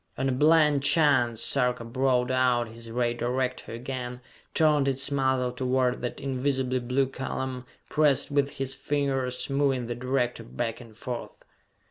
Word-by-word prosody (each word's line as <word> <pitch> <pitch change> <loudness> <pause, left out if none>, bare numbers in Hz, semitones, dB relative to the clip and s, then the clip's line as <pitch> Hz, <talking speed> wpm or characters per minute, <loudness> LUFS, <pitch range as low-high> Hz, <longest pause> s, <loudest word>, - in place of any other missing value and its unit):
On 135 - 0
a - - +1
blind 150 +1 +4
chance, 130 -6 +3
Sarka 125 -1 +2
brought 125 +1 +1
out 125 -2 +2
his 115 +1 -11
ray 120 0 0
director 125 +2 -2
again, 125 +1 -5 0.4
turned 150 -3 +3
its 135 +1 +1
muzzle 130 -2 +1
toward 125 0 0
that 120 - -4
invisibly 130 -1 -1
blue 125 +3 +1
column, 130 -1 -5 0.2
pressed 150 -4 +2
with 140 -1 +2
his 135 -1 -2
fingers, 135 -3 -1
moving 135 -3 +1
the 120 - -3
director 125 -1 -1
back 115 +1 -4
and 110 -3 -14
forth. 120 0 -6
130 Hz, 145 wpm, -27 LUFS, 125-135 Hz, 0.4 s, blind